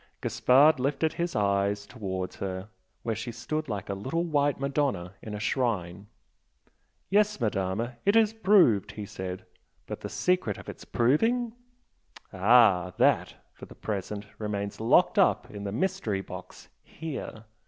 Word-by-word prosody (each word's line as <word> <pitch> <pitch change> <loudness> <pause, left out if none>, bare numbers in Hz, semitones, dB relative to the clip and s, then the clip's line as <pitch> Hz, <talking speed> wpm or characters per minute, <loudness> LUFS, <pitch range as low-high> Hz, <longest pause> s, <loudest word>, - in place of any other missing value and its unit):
Gaspard 125 +6 +4
lifted 140 +4 0
his 170 0 -3
eyes 100 0 +1
towards 95 -6 -5
her 95 +1 -5 0.3
where 115 - -1
she 115 +2 -5
stood 155 +5 -4
like 100 -3 -4
a 100 - -2
little 130 - -2
white 145 -4 +1
Madonna 135 -10 -1
in 105 -1 -6
a - - -5
shrine. 105 -6 -1 1.0
"Yes, 210 -1 +3
Madama, 110 +2 -1
it 200 +2 +3
is 220 -1 +4
proved!" 190 - +4
he 105 - -6
said 95 -1 -6 0.4
"But - - -7
the - - -5
secret 180 - 0
of - - -12
its - - -9
proving? 225 - +2 0.4
" - - -21
"Ah! 95 -3 +5
That, - - +3 0.2
for - - -12
the - - -13
present, 105 0 -4
remains 100 -2 -3
locked 115 - +4
up - - +2
in 100 -1 -7
the 100 - -3
mystery 110 - -1
box - - -10
here!" 140 -8 -7
115 Hz, 150 wpm, -28 LUFS, 100-145 Hz, 1.0 s, Ah